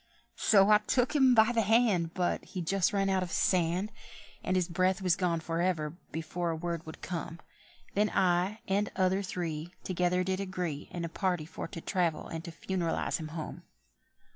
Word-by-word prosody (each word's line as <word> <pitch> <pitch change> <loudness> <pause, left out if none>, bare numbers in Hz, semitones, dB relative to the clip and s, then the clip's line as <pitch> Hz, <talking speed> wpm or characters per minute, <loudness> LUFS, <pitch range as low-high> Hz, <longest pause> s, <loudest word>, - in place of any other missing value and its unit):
So 200 -1 +5
I 210 - +7
took 245 +5 +1
him 260 -3 +6
by 220 +1 +6
the 230 -2 +2
hand, 210 -6 +2
But 180 -1 0
he'd 180 -3 -6
just 195 +1 +2
run 195 -1 +1
out 190 -1 +2
his 180 -2 -4
sand, 180 +3 +1 0.5
And 185 - 0
his 180 -2 +2
breath 185 +2 +1
was 185 -3 +2
gone 175 -3 0
for 165 +1 -2
ever—before 170 0 -2
a 165 - -1
word 170 0 -4
would 160 - -10
come; 170 -1 -5 0.5
Then 210 +1 +2
I 185 +4 +1
and 200 +1 +1
other 190 +1 +2
three 175 -3 -4
Together 180 0 +1
did 190 +1 -1
agree 180 -6 -3
In 170 -1 -4
a - - -2
party 175 -2 -1
for 160 - -6
to 165 - -8
travel 175 -4 0
and 165 0 -6
to 170 - -6
funeralise 170 0 -1
him 155 - -5
home. 155 0 -6
180 Hz, 185 wpm, -30 LUFS, 170-195 Hz, 0.5 s, I